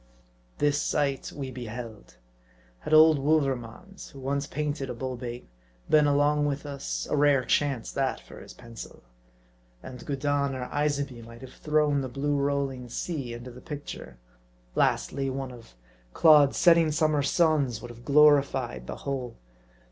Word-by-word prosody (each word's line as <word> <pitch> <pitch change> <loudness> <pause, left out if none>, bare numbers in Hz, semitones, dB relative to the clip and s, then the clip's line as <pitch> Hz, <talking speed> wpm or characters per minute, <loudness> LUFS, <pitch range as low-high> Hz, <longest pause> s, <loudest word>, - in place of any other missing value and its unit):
This 145 0 +1
sight 140 -2 -1
we 135 -2 -6
beheld. 115 - -8 0.6
Had - - -7
old 155 -1 +7
Wouvermans, 140 - -2
who 135 - -13
once 140 +2 -2
painted 145 -2 -3
a - - -4
bull 130 +1 -4
bait, 120 0 -7 0.4
been 150 -1 +5
along 145 +1 +2
witlr 145 0 -3
us, 100 - -4
a - - +2
rare 145 -3 +3
chance, 140 -5 0
that, 135 -1 -1
for - - -13
his - - -12
pencil. 115 -2 -11 0.8
And 125 -1 -9
Gudin 140 -1 -1
or 125 -1 -5
Isabey 140 -4 -1
might 115 +1 -13
have 130 0 -11
thrown 150 -2 +1
the 130 - -4
blue 145 +3 -1
rolling 140 -3 -2
sea 135 -1 -4
into 120 +1 -9
the 125 +1 -13
picture. 145 - -8 0.6
Lastly, 135 - 0
one 135 0 -4
of 115 - -14 0.4
Claude's 150 -3 +6
setting 165 -2 +5
summer 155 -1 +2
suns 140 -5 +1
would 120 +1 -9
have 120 0 -14
glorified 140 - +3
the - - -5
whole. 130 -3 -3
140 Hz, 150 wpm, -27 LUFS, 125-145 Hz, 0.8 s, old